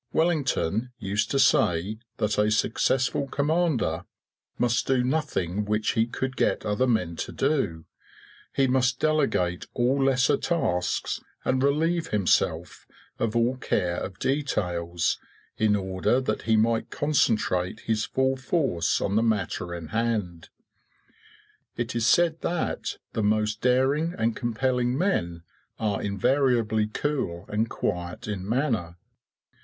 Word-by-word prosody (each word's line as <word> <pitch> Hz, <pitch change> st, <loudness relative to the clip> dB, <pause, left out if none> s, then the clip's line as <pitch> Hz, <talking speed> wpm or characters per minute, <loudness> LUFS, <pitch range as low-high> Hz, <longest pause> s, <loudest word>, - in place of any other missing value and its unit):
Wellington 135 Hz, -, 0 dB
used 100 Hz, +2 st, -1 dB
to 140 Hz, -, 0 dB
say 105 Hz, -6 st, +2 dB, 0.2 s
that 105 Hz, 0 st, 0 dB
a 105 Hz, 0 st, +3 dB
successful 130 Hz, +5 st, +1 dB
commander 140 Hz, -, 0 dB, 0.5 s
must 120 Hz, -1 st, +1 dB
do 130 Hz, -2 st, +2 dB
nothing 125 Hz, -, -1 dB
which 105 Hz, +1 st, 0 dB
he 115 Hz, +1 st, +1 dB
could 130 Hz, +2 st, -3 dB
get -, -, 0 dB
other 105 Hz, +5 st, +1 dB
men 90 Hz, -9 st, 0 dB
to -, -, -4 dB
do; 135 Hz, -, -1 dB, 0.7 s
he 135 Hz, -, +2 dB
must 125 Hz, -1 st, +2 dB
delegate 140 Hz, -, +1 dB
all 130 Hz, +3 st, +2 dB
lesser 135 Hz, +1 st, +3 dB
tasks 90 Hz, -, -1 dB, 0.2 s
and 130 Hz, 0 st, +1 dB
relieve 160 Hz, +4 st, +1 dB
himself 100 Hz, -5 st, 0 dB, 0.3 s
of 115 Hz, 0 st, -1 dB
all 120 Hz, +2 st, +2 dB
care 90 Hz, -8 st, -1 dB
of 95 Hz, -1 st, -5 dB
details, 90 Hz, -, -1 dB, 0.4 s
in 110 Hz, -1 st, +3 dB
order 95 Hz, +5 st, 0 dB
that 120 Hz, -5 st, -2 dB
he 110 Hz, -, +5 dB
might 115 Hz, +1 st, +1 dB
concentrate 110 Hz, -11 st, +1 dB
his 110 Hz, -1 st, 0 dB
full 130 Hz, 0 st, +1 dB
force 130 Hz, -, 0 dB
on 100 Hz, -, 0 dB
the 110 Hz, -, +4 dB
matter 105 Hz, -5 st, -1 dB
in 85 Hz, -3 st, -6 dB
hand. 105 Hz, -6 st, -2 dB, 1.3 s
It 120 Hz, -1 st, -3 dB
is 115 Hz, -1 st, +1 dB
said 170 Hz, -2 st, +3 dB
that 170 Hz, -2 st, -2 dB, 0.2 s
the 110 Hz, -, -1 dB
most 105 Hz, 0 st, +1 dB
daring 135 Hz, +7 st, +2 dB
and 115 Hz, 0 st, 0 dB
compelling 125 Hz, +1 st, 0 dB
men 85 Hz, -, -1 dB, 0.4 s
are 105 Hz, -3 st, -1 dB
invariably 110 Hz, +1 st, +1 dB
cool 110 Hz, -9 st, -2 dB
and 110 Hz, +2 st, 0 dB
quiet 90 Hz, +2 st, -3 dB
in 100 Hz, -2 st, -4 dB
manner. 115 Hz, -, -1 dB
115 Hz, 130 wpm, -26 LUFS, 100-135 Hz, 1.3 s, he